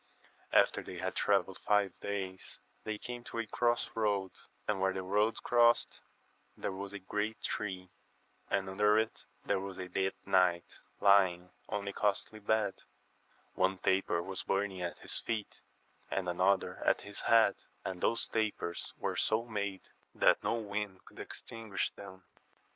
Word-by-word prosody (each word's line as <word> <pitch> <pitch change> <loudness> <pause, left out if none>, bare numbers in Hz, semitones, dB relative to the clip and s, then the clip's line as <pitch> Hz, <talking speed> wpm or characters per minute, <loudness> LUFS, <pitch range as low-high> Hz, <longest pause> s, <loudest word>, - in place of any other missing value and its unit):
After - - +4
they - - -8
had - - -2
travelled - - +2
five 100 -3 +1
days 95 -2 -4 0.3
they 110 -1 -2
came 120 +2 -6
to - - -6
a 115 - 0
cross 120 +2 +1
road, 100 -4 0 0.4
and 105 -3 0
where 95 0 +2
the 95 0 -3
roads 105 +4 +2
crossed 120 -1 +3 0.6
there - - -2
was 95 +1 -6
a 100 - -5
great 105 +3 -2
tree, 95 -3 -3 0.6
and 95 -1 +1
under* 105 +2 +3
it 110 0 -1 0.2
there 100 - +1
was 95 -1 -6
a 95 - -5
dead 95 +1 0
knight, 90 -2 +2 0.2
lying 95 -3 +4 0.2
on 100 -1 -2
a 100 - -2
costly 105 +1 0
bed, 105 -1 0 0.7
one 95 +1 +2
taper 95 -2 +1
was 95 0 -3
burning 95 -1 -1
at 85 -1 -3
his - - +1
feet, 110 -3 -4 0.5
and 95 -2 -1
another 95 +2 +2
at - - +3
his 100 0 -6
head, 115 -1 +5 0.3
and 90 -1 -4
those 115 - +3
tapers 105 -6 -2
were - - -2
so 110 +2 +2
made 100 -4 -3 0.3
that - - +4
no - - +1
wind 105 -3 -4
could - - -15
extinguish 110 -3 -4
them. 95 -2 -11
100 Hz, 155 wpm, -33 LUFS, 95-110 Hz, 0.7 s, head